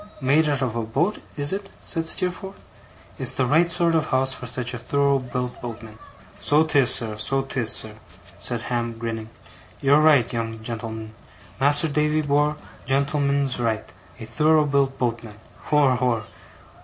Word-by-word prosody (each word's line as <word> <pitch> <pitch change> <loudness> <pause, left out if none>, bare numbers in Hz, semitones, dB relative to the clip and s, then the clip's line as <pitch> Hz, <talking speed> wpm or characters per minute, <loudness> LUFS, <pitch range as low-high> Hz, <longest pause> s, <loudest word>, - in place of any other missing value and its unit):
'Made 150 +3 +3
out 140 -2 0
of 120 -3 -2
a 115 - -1
boat, 140 - -1 0.2
is 145 +4 +1
it?' 195 0 -4
said 165 -2 -4
Steerforth. 185 +3 -2 0.6
'It's - - +1
the 130 - +1
right 160 +6 +3
sort 170 -1 +1
of 160 -1 +1
a - - -9
house 130 0 +2
for 125 - -8
such 125 +1 -3
a 120 - -5
thorough 140 +3 +1
built 125 -1 -5
boatman.' 115 -2 -8 0.4
'So 150 +2 +3
'tis, 140 -6 +3
sir, 110 -4 0
so 135 +5 0
'tis, 125 -4 -2
sir,' 110 -3 -5 0.4
said 120 -2 -2
Ham, 120 -2 -2
grinning. 115 -1 -5 0.5
'You're 140 +2 +4
right, 145 -7 +4
young 115 -1 -3
gen'l'm'n! 110 -1 -6 0.5
Mas'r 145 +2 +4
Davy 150 +1 +1
bor', 145 +1 +1 0.3
gen'l'm'n's 140 -1 +1
right. 110 -2 -2 0.3
A 115 - -7
thorough 155 +6 +3
built 140 -1 +1
boatman! 115 -3 -3 0.3
Hor, 145 -4 +3
hor! 125 -3 0
135 Hz, 165 wpm, -23 LUFS, 115-150 Hz, 0.6 s, You're